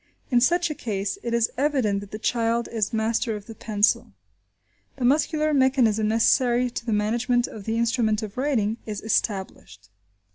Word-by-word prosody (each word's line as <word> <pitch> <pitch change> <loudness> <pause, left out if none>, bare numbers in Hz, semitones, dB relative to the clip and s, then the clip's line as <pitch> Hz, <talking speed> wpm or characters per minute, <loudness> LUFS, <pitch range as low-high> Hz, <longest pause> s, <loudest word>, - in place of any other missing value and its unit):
In 240 -1 +4
such 345 +4 +2
a - - -1
case, 210 - -3
it 235 - -4
is 235 -1 +1
evident 260 -9 +1
that 200 0 -10
the 215 - -6
child 230 +1 0
is 220 -3 -1
master 225 +1 0
of 205 -1 -8
the 225 - -9
pencil. 210 - 0 0.8
The 255 - -2
muscular 305 +3 +2
mechanism, 255 -6 +3
necessary 240 +2 +2
to 235 - -6
the - - 0
management 235 +4 +1
of 210 -3 -9
the 225 0 -1
instrument 225 -2 +1
of 210 -1 -7
writing, 240 -6 0
is 210 -2 -4
established. 190 - -3
230 Hz, 170 wpm, -24 LUFS, 215-250 Hz, 0.8 s, In